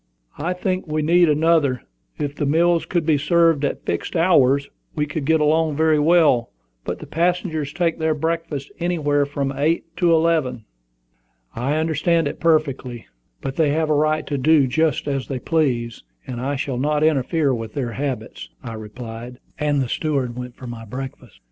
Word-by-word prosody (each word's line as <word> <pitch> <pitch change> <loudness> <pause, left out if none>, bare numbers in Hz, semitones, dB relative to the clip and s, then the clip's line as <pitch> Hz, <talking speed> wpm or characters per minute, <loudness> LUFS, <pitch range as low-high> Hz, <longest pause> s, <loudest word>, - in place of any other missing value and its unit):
"I 170 +5 -1
think 185 0 -2
we 155 0 -1
need 170 +2 +4
another. 150 -4 +2 0.3
If 145 -2 -3
the 145 - -1
meals 170 +3 +2
could 175 -3 0
be 155 -3 +3
served 165 0 +3
at 140 - -2
fixed 85 - -3
hours, 140 -5 +4 0.3
we 150 -2 0
could 150 -1 -4
get 160 +2 +3
along 155 0 +2
very 155 0 +3
well; 150 -7 +4 0.3
but - - -4
the - - -9
passengers 165 -3 -1
take 165 0 -1
their 160 -1 +1
breakfast 160 -2 -3
anywhere 145 -5 +1
from 140 -1 -2
eight 165 +3 -1
to 175 -1 +3
eleven." 160 -8 +1 0.9
"I 130 +6 -1
understand 160 +1 +1
it - - -5
perfectly; 140 -7 0 0.4
but 135 0 -5
they 160 -3 +3
have 155 0 0
a - - +5
right 155 +1 +1
to 145 -2 -2
do 150 +1 +4
just 155 +3 0
as 135 -2 -2
they 135 - -3
please, 125 -5 -1 0.2
and 120 -1 -5
I 140 +3 -1
shall 130 -2 -3
not 150 +2 +1
interfere 155 -1 +2
with 115 -2 -5
their 125 -4 -2
habits," 125 -1 -5
I 115 -2 -6
replied; 115 +2 -8 0.2
and 145 -2 +1
the - - -4
steward 135 -3 -1
went 125 -1 -7
for 130 - -11
my 120 -2 -7
breakfast. 130 -1 -8
150 Hz, 175 wpm, -21 LUFS, 130-160 Hz, 0.9 s, a